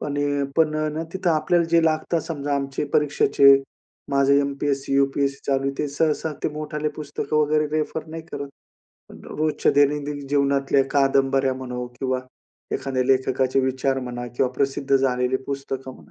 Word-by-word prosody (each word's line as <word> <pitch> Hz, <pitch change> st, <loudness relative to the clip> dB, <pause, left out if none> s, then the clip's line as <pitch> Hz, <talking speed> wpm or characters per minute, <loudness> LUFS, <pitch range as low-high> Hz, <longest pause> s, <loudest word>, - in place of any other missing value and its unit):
पण 145 Hz, -1 st, -3 dB
अ 145 Hz, -1 st, 0 dB
पण 155 Hz, -2 st, +3 dB
आहे 155 Hz, 0 st, 0 dB
ना 160 Hz, -, -2 dB
तिथे 185 Hz, -2 st, 0 dB
आपल्याला 170 Hz, +2 st, +2 dB
जे 170 Hz, 0 st, +4 dB
लागतं 160 Hz, +1 st, +1 dB
समजा, 145 Hz, -3 st, -3 dB
आमचे 140 Hz, +1 st, -2 dB
परीक्षेचे 140 Hz, -1 st, +5 dB, 0.6 s
माझं 140 Hz, 0 st, +3 dB
एम-पी-एस-सी, 140 Hz, -1 st, 0 dB
यू-पी-एस-सी 140 Hz, 0 st, +1 dB
चालू 135 Hz, 0 st, +1 dB
ते 150 Hz, -, 0 dB
सहसा 155 Hz, +2 st, 0 dB
ते -, -, +1 dB
मोठाले 150 Hz, 0 st, -3 dB
पुस्तकं 150 Hz, 0 st, -3 dB
वगैरे 150 Hz, 0 st, +2 dB
रेफर 155 Hz, +1 st, -2 dB
नाही 160 Hz, +1 st, -7 dB
करत. 140 Hz, 0 st, -5 dB, 0.9 s
रोजच्या 155 Hz, 0 st, +1 dB
दैनंदिन 145 Hz, 0 st, +1 dB
जीवनातल्या 140 Hz, -1 st, +2 dB
कादंबऱ्या 135 Hz, -1 st, +2 dB
म्हणो 125 Hz, -1 st, -5 dB
किंवा 130 Hz, -1 st, -1 dB, 0.5 s
एखाद्या 130 Hz, -2 st, -1 dB
लेखकाचे 130 Hz, 0 st, +2 dB
विचार 130 Hz, +1 st, 0 dB
म्हणा 120 Hz, -1 st, -5 dB
किंवा 130 Hz, -1 st, +2 dB
प्रसिद्ध 135 Hz, +1 st, +1 dB
झालेली 125 Hz, -1 st, +1 dB
पुस्तकं 135 Hz, -1 st, -5 dB
म्हणा, -, -, -18 dB
140 Hz, 150 wpm, -23 LUFS, 135-150 Hz, 0.9 s, परीक्षेचे